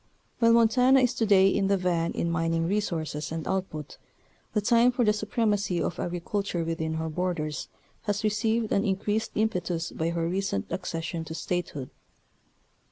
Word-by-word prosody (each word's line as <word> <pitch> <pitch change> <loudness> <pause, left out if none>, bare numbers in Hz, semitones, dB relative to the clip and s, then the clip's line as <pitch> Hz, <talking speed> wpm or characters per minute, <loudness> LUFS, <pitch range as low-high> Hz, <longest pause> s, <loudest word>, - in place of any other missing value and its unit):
While 230 -1 +5
Mon 230 -1 +6
tana 255 +3 +5
is 250 -2 +2
to 225 - 0
day 195 -2 +6
in 195 0 +2
the 200 0 +3
van 175 -2 0
in 170 - -1
mining 165 0 0
resources 160 -7 -2
and 160 -1 -4
output, 185 -6 -3 0.5
the 215 - +2
time 235 +3 +4
for 245 -1 +1
the 210 - +4
supremacy 210 -3 0
of 170 - -2
agriculture 175 +1 -2
within 160 -1 -2
her 160 0 -2
borders 160 -2 -2 0.4
has 205 -1 -1
received 220 +1 +1
an 200 - +2
increased 205 +3 -1
impetus 180 -6 -1
by 160 +1 -1
her 170 -1 -1
recent 180 - -1
accession 165 -2 -3
to 160 +1 -6
State 175 0 -2
hood. 135 -3 -7
185 Hz, 165 wpm, -27 LUFS, 165-210 Hz, 0.5 s, Mon